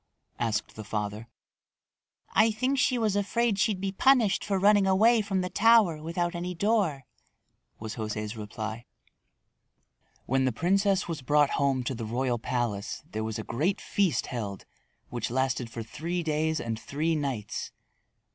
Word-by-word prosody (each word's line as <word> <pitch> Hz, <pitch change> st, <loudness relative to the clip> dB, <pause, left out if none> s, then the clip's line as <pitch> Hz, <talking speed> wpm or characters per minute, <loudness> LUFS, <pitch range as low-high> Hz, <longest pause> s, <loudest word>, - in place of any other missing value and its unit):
asked 110 Hz, -2 st, -1 dB
the 110 Hz, -, -7 dB
father. 105 Hz, +1 st, -4 dB, 1.1 s
"I 220 Hz, +1 st, +5 dB
think 255 Hz, +5 st, 0 dB
she 255 Hz, 0 st, +2 dB
was 220 Hz, -4 st, +1 dB
afraid 205 Hz, +1 st, +1 dB
she'd 205 Hz, -2 st, +1 dB
be 195 Hz, 0 st, -2 dB
punished 235 Hz, -1 st, +3 dB
for 200 Hz, -2 st, 0 dB
running 200 Hz, 0 st, +4 dB
away 220 Hz, +5 st, +5 dB
from 195 Hz, -2 st, -1 dB
the 180 Hz, -, -3 dB
tower 215 Hz, -8 st, +4 dB
without 170 Hz, +2 st, -2 dB
any 175 Hz, +1 st, -4 dB
door," 185 Hz, -, +1 dB, 0.7 s
was 110 Hz, +1 st, -6 dB
José's 105 Hz, 0 st, -4 dB
reply. 110 Hz, +2 st, -6 dB, 1.4 s
When 130 Hz, +1 st, +1 dB
the 130 Hz, -, +2 dB
princess 195 Hz, -, +1 dB
was 165 Hz, -4 st, -4 dB
brought 145 Hz, +2 st, +3 dB
home 135 Hz, -2 st, +1 dB
to 130 Hz, -, -2 dB
the 115 Hz, -2 st, -5 dB
royal 120 Hz, +2 st, -1 dB
palace 115 Hz, -4 st, -2 dB
there 110 Hz, +1 st, -3 dB
was 110 Hz, -1 st, -3 dB
a 110 Hz, -, -4 dB
great 155 Hz, -, -1 dB
feast 195 Hz, -6 st, 0 dB
held 105 Hz, -6 st, -5 dB, 0.4 s
which 120 Hz, -3 st, -3 dB
lasted 130 Hz, -1 st, -1 dB
for 115 Hz, 0 st, -6 dB
three 165 Hz, +9 st, -4 dB
days 160 Hz, 0 st, 0 dB
and 115 Hz, -1 st, -3 dB
three 155 Hz, +7 st, -1 dB
nights. 135 Hz, -9 st, -3 dB
150 Hz, 155 wpm, -28 LUFS, -, 1.4 s, I